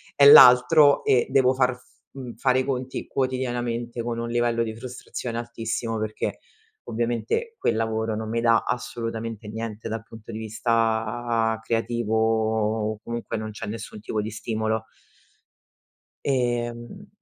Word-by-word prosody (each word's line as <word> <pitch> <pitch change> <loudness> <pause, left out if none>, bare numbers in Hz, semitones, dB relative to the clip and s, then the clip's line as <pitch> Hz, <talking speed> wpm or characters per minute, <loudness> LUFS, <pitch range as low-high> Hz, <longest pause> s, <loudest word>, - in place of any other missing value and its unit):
è 140 - +6
l'altro 140 +4 +8
e 125 -2 +3
devo 130 -1 +4
far 130 -1 +1
f 125 - -23 0.3
mhmm, 130 -3 -8
fare 130 -1 +2
i 130 - -1
conti 130 -1 -3
quotidianamente 120 -2 -2
con 115 -1 -3
un 115 - -3
livello 120 -1 +1
di 110 -1 -5
frustrazione 120 -1 -6
altissimo, 115 -1 -3
perché 110 0 -3 0.5
ovviamente 120 - -2
quel 115 - 0
lavoro 110 -1 -1
non 110 0 -4
mi 115 +1 -1
dà 115 -1 +4
assolutamente 115 -3 -4
niente 110 0 -6
dal 110 0 -4
punto 115 0 -12
di 110 - -5
vista 115 0 0
creativo 115 0 -1 0.8
o 105 - -13
comunque 120 -1 -4
non 110 0 -5
c'è 105 - -7
nessun 110 -1 -7
tipo 110 0 -2
di 110 - -4
stimolo. 110 0 -2 1.4
Ehm 120 - -2
115 Hz, 140 wpm, -24 LUFS, 110-125 Hz, 1.4 s, l'altro